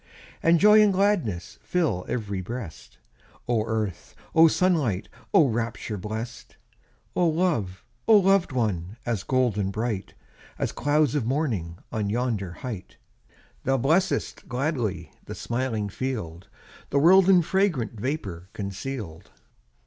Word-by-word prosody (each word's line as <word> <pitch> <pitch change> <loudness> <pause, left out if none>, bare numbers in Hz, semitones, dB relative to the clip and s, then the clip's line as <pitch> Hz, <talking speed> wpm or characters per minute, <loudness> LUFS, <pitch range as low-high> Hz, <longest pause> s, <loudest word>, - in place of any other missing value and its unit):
And 165 0 +4
joy 210 +3 +7
and 210 -1 +5
gladness 185 - 0
Fill 155 - -1
ev'ry 100 -5 -2
breast! 110 -3 -8 0.5
Oh 115 -3 +2
earth! 110 -6 -3 0.2
oh 165 0 +7
sunlight! 155 - +1 0.2
Oh 155 - +6
rapture 115 -2 -3
blest! 110 +5 -6 0.6
Oh 175 - +3
love! 155 - -1 0.2
oh 220 - +8
loved 195 -3 +3
one! 105 -5 -2
As 115 -5 -1
golden 115 -6 +1
bright, 105 -1 -3 0.4
As - - -1
clouds 145 -2 +1
of 140 -7 0
morning 115 - -1
On 105 -2 -1
yonder 110 -5 -1
height! 110 -7 -7 0.7
Thou 135 +1 +2
blessest 160 +9 0
gladly 120 - -2
The - - -7
smiling 120 -4 -2
field, 100 -7 -5 0.4
The 140 - 0
world 185 +6 +6
in 180 -3 +6
fragrant 155 - 0
Vapour 100 - -4
conceal'd. 100 -3 -6
120 Hz, 125 wpm, -26 LUFS, 100-155 Hz, 0.7 s, oh